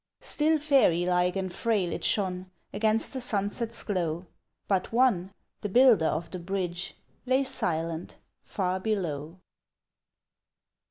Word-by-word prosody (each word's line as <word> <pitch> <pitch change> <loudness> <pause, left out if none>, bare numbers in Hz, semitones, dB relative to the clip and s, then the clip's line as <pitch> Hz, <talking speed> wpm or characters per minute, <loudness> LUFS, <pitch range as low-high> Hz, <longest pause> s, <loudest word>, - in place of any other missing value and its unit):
Still 310 +1 +1
fairy 270 - +3
like 180 0 +2
and 190 -2 -3
frail 210 -6 0
it - - -5
shone 185 -2 0 0.2
Against 215 +4 +1
the 260 - -2
sunset's 225 +1 -1
glow 175 -4 -2 0.4
But 190 -2 0
one, 225 -7 +2 0.3
the 205 - -3
builder 230 -7 +5
of 165 +2 -2
the 185 - -5
bridge, 180 -1 -3 0.3
Lay 260 +2 +3
silent, 165 -10 -2 0.2
far 185 -1 -2
below! 175 -6 -3
190 Hz, 120 wpm, -28 LUFS, 175-225 Hz, 0.4 s, builder